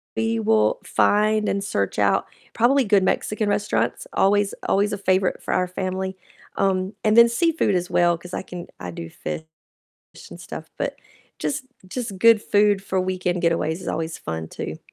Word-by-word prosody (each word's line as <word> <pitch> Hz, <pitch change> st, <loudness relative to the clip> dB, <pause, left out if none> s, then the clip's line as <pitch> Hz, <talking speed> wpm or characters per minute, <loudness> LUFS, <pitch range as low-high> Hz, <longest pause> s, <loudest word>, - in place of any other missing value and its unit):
we 225 Hz, 0 st, 0 dB
will 220 Hz, -, +2 dB
find 215 Hz, +1 st, +2 dB
and 200 Hz, 0 st, -1 dB
search 100 Hz, -, -2 dB
out, -, -, +2 dB, 0.3 s
probably 260 Hz, +4 st, +3 dB
good 200 Hz, -1 st, +4 dB
Mexican 215 Hz, +2 st, 0 dB
restaurants, 210 Hz, -, 0 dB
always 205 Hz, +1 st, +2 dB, 0.2 s
always 205 Hz, +2 st, +2 dB
a -, -, -2 dB
favorite 190 Hz, -1 st, +1 dB
for -, -, -3 dB
our 180 Hz, -, +1 dB
family, 190 Hz, +1 st, -3 dB, 0.4 s
um, 190 Hz, +1 st, 0 dB
and 215 Hz, +1 st, +3 dB
then 235 Hz, 0 st, +9 dB
seafood 320 Hz, -, +1 dB
as 180 Hz, 0 st, -1 dB
well, 175 Hz, -1 st, +3 dB
'cause 180 Hz, +1 st, -12 dB
I -, -, -4 dB
can 175 Hz, -2 st, -8 dB
I 90 Hz, -1 st, -6 dB
do 85 Hz, 0 st, -7 dB
fish 160 Hz, -, -5 dB, 0.9 s
and -, -, -10 dB
stuff, -, -, -8 dB
but -, -, -2 dB, 0.4 s
just 265 Hz, -2 st, -3 dB, 0.2 s
just 215 Hz, -2 st, -5 dB
good 230 Hz, 0 st, +6 dB
food 205 Hz, -1 st, +3 dB
for 190 Hz, -1 st, -2 dB
weekend 180 Hz, -1 st, -1 dB
getaways 165 Hz, 0 st, +1 dB
is -, -, -5 dB
always 160 Hz, +1 st, -3 dB
fun 80 Hz, 0 st, -5 dB
too. -, -, -6 dB
195 Hz, 175 wpm, -23 LUFS, 180-215 Hz, 0.9 s, then